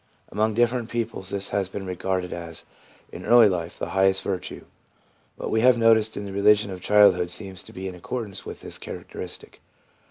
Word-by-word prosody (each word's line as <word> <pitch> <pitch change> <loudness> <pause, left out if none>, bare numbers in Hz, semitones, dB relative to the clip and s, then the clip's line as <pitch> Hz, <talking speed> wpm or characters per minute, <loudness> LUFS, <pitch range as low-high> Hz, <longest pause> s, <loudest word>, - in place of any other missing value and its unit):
Among 110 +1 0
different 120 0 +1
peoples 115 -5 -3
this 100 0 -1
has 100 -2 -1
been 95 0 -6
regarded 90 0 -2
as, 85 -2 -6 0.5
in - - -9
early 120 -2 +7
life, 85 -3 -3
the 85 - -4
highest 95 0 +3
virtue. 95 -2 -4 0.7
What - - -4
we 110 - +2
have 125 0 +5
noticed 110 -1 +4
in 100 - -4
the 100 - -7
religion 105 0 +4
of 90 -1 -7
childhood 95 -4 +5
seems 95 0 -6
to - - -12
be 95 +1 -6
in 95 - -5
accordance 100 +3 -5
with - - -9
this - - -4
characteristic. - - -8
100 Hz, 185 wpm, -25 LUFS, 95-110 Hz, 0.7 s, early